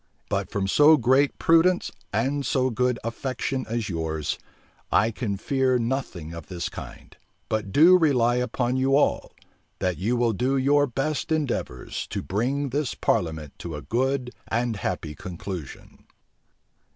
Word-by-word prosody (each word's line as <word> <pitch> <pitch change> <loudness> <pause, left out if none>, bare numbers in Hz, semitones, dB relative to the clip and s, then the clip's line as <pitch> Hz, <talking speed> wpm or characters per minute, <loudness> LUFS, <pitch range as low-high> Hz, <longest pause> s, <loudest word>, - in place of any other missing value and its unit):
But 100 -2 -1
from 100 -1 -1
so 150 +9 +6
great 130 +3 +3
prudence 170 +2 +3 0.2
and 135 +7 0
so 130 -1 +1
good 125 +1 +1
affection 130 +2 -3
as 115 -2 -2
yours, 80 -4 -2 0.5
I 110 +2 +3
can 105 -3 -3
fear 130 +3 +1
nothing 115 - -3
of 85 -2 -8
this 85 -2 -4
kind; - - -10 0.3
but 105 -3 -2
do 175 - +7
rely 125 -7 +3
upon 125 +1 0
you 135 +1 +3
all, 145 - +1 0.5
that 90 -2 -1
you 110 +6 +1
will 120 -1 +2
do 130 +6 0
your 145 +2 +3
best 140 +5 -2
endeavors 140 - -2
to - - -4
bring 135 +8 -1
this 140 0 -1
parliament 80 -4 -1
to 85 -3 -6
a 75 - -7
good 130 +1 0 0.2
and 120 -1 -1
happy 90 -6 -3
conclusion." 90 -2 -8
120 Hz, 145 wpm, -25 LUFS, 95-135 Hz, 0.5 s, do